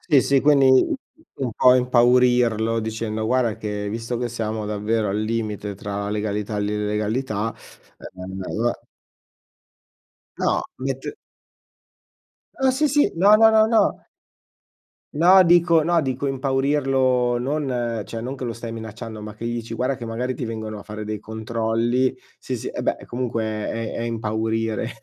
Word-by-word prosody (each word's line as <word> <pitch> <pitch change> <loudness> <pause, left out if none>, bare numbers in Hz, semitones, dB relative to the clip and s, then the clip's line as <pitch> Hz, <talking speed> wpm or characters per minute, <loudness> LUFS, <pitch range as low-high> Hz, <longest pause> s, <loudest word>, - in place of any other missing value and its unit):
Sì, 140 -3 +4
sì, 140 -1 +3
quindi 135 -3 +5 0.5
un 130 -4 -3
po' 125 +3 +5
impaurirlo 120 -2 +3
dicendo: 110 0 -3
"Guarda 120 -2 +1
che 105 -2 -4
visto 115 +3 -3
che 120 0 -2
siamo 110 -2 -3
davvero 105 +1 -1
al 100 +2 -1
limite 110 -2 -3
tra 100 +1 -5
la - - -3
legalità 105 0 -2
e - - -1
l'illegalità, 105 +2 -1 0.6
ehm, 95 +1 -7
allora" 120 +5 -2 1.6
No, - - +1 0.2
mett 135 0 -3 1.6
Ah 265 -1 +3
sì, 275 +4 +1
sì, 290 +1 +3
no, 200 +5 +6
no, 225 +1 +7
no, 220 0 +5
no 225 0 +1 1.1
no, 180 +5 +7
dico 170 -1 +5
no, 170 0 +3
dico 130 -1 -2
impaurirlo 135 -2 +1
non 125 -4 -2
cioè 115 +3 -7
non 130 +3 -4
che 130 - -6
lo 115 -1 -3
stai 115 0 -7
minacciando, 110 0 -7
ma 105 0 -8
che 110 - -9
gli 120 - -2
dici: 115 0 -5
"Guarda 130 +4 0
che 120 -3 -7
magari 125 +3 -2
ti 120 - -4
vengono 110 -1 -5
a - - -9
fare 105 0 -7
dei 105 0 -4
controlli", 115 +3 -1 0.2
sì, - - -4
sì, - - -5
eh - - -5
beh, - - -2
comunque 120 -2 -3
è 110 +1 -3
è - - -4
impaurire 110 0 -2
115 Hz, 155 wpm, -22 LUFS, 110-130 Hz, 1.6 s, no